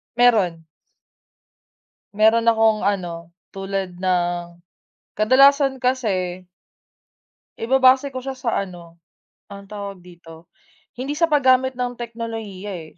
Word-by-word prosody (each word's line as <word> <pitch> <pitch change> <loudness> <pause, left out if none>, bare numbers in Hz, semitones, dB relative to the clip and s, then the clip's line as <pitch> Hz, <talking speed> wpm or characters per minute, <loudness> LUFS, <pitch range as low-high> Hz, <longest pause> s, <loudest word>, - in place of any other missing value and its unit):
Meron. 205 -9 +2 1.5
Meron 220 +2 +3
akong 220 -2 +3
ano, 170 -4 -3 0.2
tulad 195 -2 -5
ng, 175 -1 -2 0.6
kadalasan 270 +3 +4
kasi 185 -8 -1 1.1
ibabase 260 +3 +4
ko 260 - -8
siya 265 +1 -5
sa 255 -2 -4 0.2
ano, 170 -2 -13 0.5
anong 200 -1 -11
tawag 200 -2 -7
dito, 170 -2 -15 0.5
hindi 265 +4 -3
sa 330 +3 +1
paggamit 260 -3 +3
ng 250 -1 -2
teknolohiya, 225 -4 -7 0.2
eh. - - -27
215 Hz, 100 wpm, -21 LUFS, 180-255 Hz, 1.5 s, kadalasan